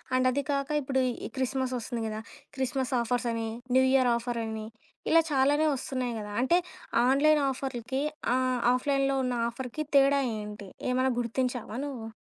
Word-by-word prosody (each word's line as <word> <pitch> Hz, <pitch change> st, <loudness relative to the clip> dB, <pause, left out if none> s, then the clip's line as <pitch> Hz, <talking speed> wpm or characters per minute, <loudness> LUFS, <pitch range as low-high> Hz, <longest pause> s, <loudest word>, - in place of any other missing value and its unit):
And 255 Hz, 0 st, +3 dB
అది 280 Hz, +2 st, -1 dB
కాక 275 Hz, 0 st, -1 dB
ఇప్పుడు 265 Hz, -1 st, 0 dB, 0.3 s
ఈ -, -, -10 dB
క్రిస్మస్ 260 Hz, 0 st, -1 dB
వస్తుంది 235 Hz, 0 st, -4 dB
గదా! 215 Hz, 0 st, -4 dB, 0.4 s
క్రిస్మస్ 265 Hz, 0 st, -1 dB
ఆఫర్స్ 245 Hz, +1 st, -1 dB
అని, 225 Hz, -1 st, -2 dB, 0.3 s
న్యూ 260 Hz, -, +6 dB
ఇయర్ 255 Hz, -2 st, +4 dB
ఆఫర్సని, 230 Hz, -2 st, -3 dB, 0.4 s
ఇలా 330 Hz, +1 st, +7 dB
చాలానే 290 Hz, +3 st, +3 dB
వస్తున్నాయి 255 Hz, -2 st, -3 dB
గదా! 210 Hz, -1 st, -6 dB
అంటే 340 Hz, +8 st, +4 dB, 0.5 s
ఆన్‌లైన్ 295 Hz, +3 st, +4 dB
ఆఫర్‌లకి, 265 Hz, 0 st, -3 dB, 0.3 s
ఆహ్, 255 Hz, -1 st, +1 dB
ఆఫ్‌లైన్‌లో 275 Hz, +1 st, +1 dB
ఉన్న 250 Hz, -, -1 dB, 0.2 s
ఆఫర్‌కి 260 Hz, +4 st, -5 dB
తేడా 275 Hz, 0 st, +5 dB, 0.2 s
ఏంటి? 210 Hz, -1 st, -8 dB, 0.2 s
ఏమన్నా 255 Hz, +1 st, +2 dB
గుర్తించావా 245 Hz, -1 st, -2 dB
నువ్వు? 250 Hz, -6 st, -6 dB
255 Hz, 145 wpm, -28 LUFS, 235-275 Hz, 0.5 s, ఇలా